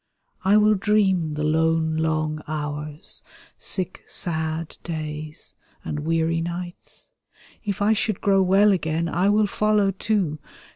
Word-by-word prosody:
I 200 +2 +5
will 215 0 +5
dream 190 -6 +2
the 150 0 -2
lone 160 +1 +2
long 155 -1 0
hours, 150 0 -3 0.4
sick 185 -2 -2
sbA 160 -1 -1 0.2
days, 155 -2 -5 0.3
and 150 - -3
weary 165 +1 +1
nights; 175 +1 -7 0.5
If 205 -1 -2
I 215 +2 +4
should 215 -2 0
grow 195 -1 +3
well 195 +3 +5
again 165 -2 0
I 180 +4 +2
will 210 +1 +4
follow 210 -1 +2
too. 190 -6 -1
165 Hz, 130 wpm, -24 LUFS, 155-195 Hz, 0.5 s, I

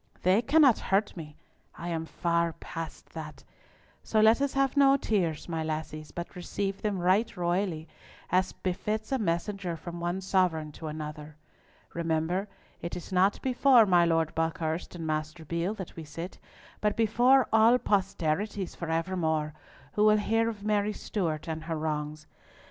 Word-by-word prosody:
They 185 +5 +4
cannot 275 -1 +5
hurt 200 +2 0
me! 150 -4 -9 0.4
I 175 - -6
am 165 -1 -3
far 170 -1 0
past 165 0 -8
that! 155 -3 -8 0.6
So 220 - 0
let 220 +4 +5
us 280 -1 +1
have 275 0 +2
no 275 -1 +6
tears, 180 - -1
my 165 -2 -2
lassies, 155 -1 -4
but 175 +2 -7
receive 195 +2 -3
them 210 -2 -1
right 185 +4 +2
royally, 175 -2 -1 0.4
as 185 +1 +2
befits 210 +5 -3
a 265 - +1
message 195 +1 -2
from 175 +1 -7
one 175 +2 -2
sovereign 180 -5 +1
to 160 +2 -8
another! 150 0 -6 0.6
Remember, 170 +4 -1 0.3
it 170 - -4
is 180 - -8
not 190 +2 +3
before 255 -2 +5
my 180 -3 +5
Lord 165 -2 +1
Buckhurst 165 +1 -2
and 165 -2 -5
Master 155 +1 -3
Beale 170 +6 -2
that 190 -5 -8
we 165 - -7
sit, 165 +4 -7 0.4
but 210 -1 +1
before 240 +3 +4
all 225 +2 +6
posterities 195 -2 -1
for 170 - -5
evermore, 160 -2 0 0.4
who 210 - +2
will 215 0 +6
hear 225 +2 +1
of 210 -3 -7
Mary 210 0 +1
Stewart 170 -8 -3
and 160 -1 -4
her 165 -1 -2
wrongs. 155 0 -3
175 Hz, 160 wpm, -29 LUFS, 160-210 Hz, 0.6 s, no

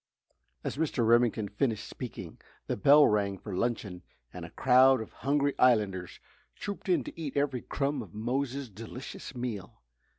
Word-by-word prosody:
As - - -4
Mr. 145 -6 0
Remington 115 -2 +3
finished 110 +1 -1
speaking 95 -9 -8 0.3
the - - -2
bell 145 +8 +7
rang 100 -2 +1
for 95 +1 -7
luncheon 105 -5 -2 0.3
and - - -7
a - - -9
crowd 130 0 +5
of 110 - -8
hungry 140 0 0
islanders 105 -7 +2 0.4
trooped 200 -1 -6
in 180 - +3
to - - -9
eat 145 -3 -4
every 140 -4 0
crumb 140 -1 -2
of 100 -7 -10
Mose's 130 +4 -2
delicious 115 +5 -9
meal. 115 - -6
120 Hz, 155 wpm, -29 LUFS, 105-140 Hz, 0.4 s, bell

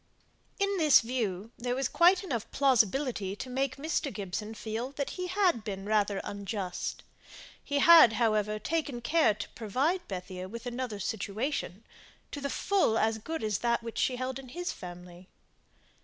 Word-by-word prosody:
In 395 -1 0
this 305 -3 +7
view 225 -4 -3
there 245 +1 -1
was 265 -1 0
quite 360 +6 +4
enough 235 - -3
plausibility 250 -5 +1
to 255 - -7
make 265 0 -1
Mr. 295 0 -2
Gibson 210 +2 -5
feel 225 +3 -4
that 280 0 -3
he 365 -1 -4
had 360 - +2
been 195 -2 -5
rather 205 -2 +1
unjust. 200 -2 -4 0.6
He 285 - -1
had, 320 -5 +8
however, 215 -2 +1
taken 285 +1 -2
care 235 -4 +3
to 210 - -6
provide 270 - -1
Bethia 185 -1 -6
with 235 +3 -8
another 245 -3 -4
situation, 215 +1 -3 0.5
to 285 - -6
the 280 - -2
full 360 - +1
as 220 0 +1
good 320 +6 -5
as 215 -2 0
that 235 -1 0
which 230 -1 -5
she 255 - +1
held 255 +1 -3
in 260 -2 -11
his 350 +7 -3
family. 180 0 -10
235 Hz, 160 wpm, -30 LUFS, 210-280 Hz, 0.6 s, had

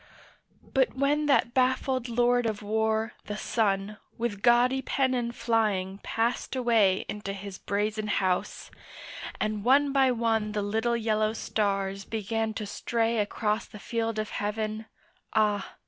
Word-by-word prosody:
But 265 -2 +1
when 290 +3 +1
that 275 -4 +3
baffled 255 -1 +1
Lord 245 0 +2
of 215 -1 -3
War 220 +1 0
the 210 - -4
Sun 210 -2 0 0.2
With 230 -4 -2
gaudy 245 +3 +4
pennon 255 -3 0
flying 205 -5 0
passed 235 +5 -1
away 225 -7 +3
Into 205 -1 -4
his 195 -1 -8
brazen 210 +2 -1
House, 185 -3 -1 0.7
and 215 -1 -1
one 275 +4 +4
by 265 -2 +4
one 225 -3 0
The 210 -1 -1
little 225 +3 0
yellow 215 -1 +1
stars 195 -3 -1
began 220 +1 -2
to 215 - -3
stray 230 +2 -1
Across 210 +1 -1
the - - -11
field 225 +1 -2
of 215 0 -3
heaven, 215 +1 -3 0.5
ah! 210 -2 +1
220 Hz, 135 wpm, -28 LUFS, 210-240 Hz, 0.7 s, gaudy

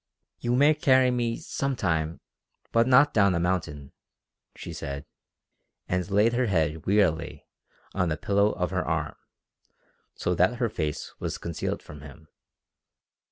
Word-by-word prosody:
"You 120 0 0
may 145 +4 +5
carry 130 -3 +4
me 120 -2 -1
some 140 -1 -3
time 80 -6 -1 0.5
but 115 +1 +3
not 135 +3 +5
down 100 -4 +4
a - - 0
mountain," 80 -6 -2 0.6
she - - -8
said, 70 +1 -6 0.8
and 90 +1 -1
laid 105 +4 +3
her 125 0 +1
head 80 -5 -1
wearily 90 -7 +1 0.5
on 90 -3 0
the 75 - -1
pillow 100 +1 +2
of 90 0 -2
her 95 -1 -1
arm, - - -2 1.0
so 90 - -1
that 90 +7 +2
her 120 -1 0
face 75 -7 -4
was - - -3
concealed 85 -4 -4
from 75 -1 -11
him. 75 +1 -13
95 Hz, 145 wpm, -26 LUFS, 80-120 Hz, 1.0 s, may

